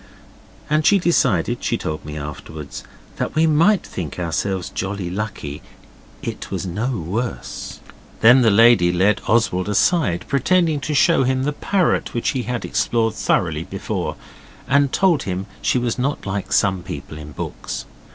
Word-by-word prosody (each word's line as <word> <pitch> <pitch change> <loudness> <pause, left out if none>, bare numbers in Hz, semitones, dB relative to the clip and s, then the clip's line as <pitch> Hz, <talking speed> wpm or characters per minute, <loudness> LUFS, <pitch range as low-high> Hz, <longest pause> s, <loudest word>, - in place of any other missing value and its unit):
And 155 +1 +2
she 200 - +5
decided, 175 -2 +1
she - - 0
told 75 - -4
me 75 0 -7
afterwards, 75 0 -7 0.3
that - - -3
we 160 +1 +4
might 165 +6 +3
think 80 -6 -6
ourselves 90 +2 -2
jolly 95 -2 -3
lucky 95 -8 -5 0.6
it - - -5
was - - -3
no 105 +8 -2
worse. 100 +9 -4 0.4
Then 125 +4 +7
the 115 - +5
lady 110 -4 +6
led 95 +4 +2
Oswald 105 -4 +2
aside, 105 - +2
pretending 160 +3 +2
to 150 +2 -3
show 165 +1 +4
him 130 0 +1
the 145 +2 0
parrot 185 -1 0
which 120 - 0
he 130 - -1
had 125 +1 -3
explored 115 -2 0
thoroughly 80 -7 0
before, - - -4 0.5
and 140 0 +3
told 180 -7 +3
him 95 0 -3 0.2
she - - +2
was 120 0 -1
not 140 +3 -1
like 100 0 -3
some 95 -3 +2
people 75 -2 -7
in 75 0 -9
books. - - -5
110 Hz, 155 wpm, -21 LUFS, 90-140 Hz, 0.6 s, Then